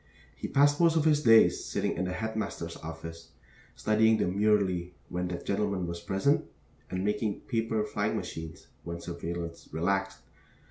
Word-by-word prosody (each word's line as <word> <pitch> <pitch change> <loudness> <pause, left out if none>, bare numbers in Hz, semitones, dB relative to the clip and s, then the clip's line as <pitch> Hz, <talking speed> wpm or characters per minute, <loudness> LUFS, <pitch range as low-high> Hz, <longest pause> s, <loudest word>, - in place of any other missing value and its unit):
He - - -5
passed 145 +2 +4
most 165 -1 +5
of 160 -1 +2
his 150 -2 +4
days 115 -4 +6
sitting - - -1
in 90 - -1
the 90 - -2
headmaster's 110 -6 -3
office, 80 +1 -9 0.4
studying 110 +1 +3
demurely 95 -3 +1
when 90 0 -2
that 90 -1 -5
gentleman 100 -2 0
was 85 0 -4
present, 100 +10 +2 0.5
and 95 +1 -2
making 105 0 -1
paper 115 -2 -1
flying - - -1
machines 80 -1 -6 0.2
when 85 0 -5
surveillance 85 -1 -6
relaxed. 95 +4 0
95 Hz, 145 wpm, -29 LUFS, 85-110 Hz, 0.5 s, days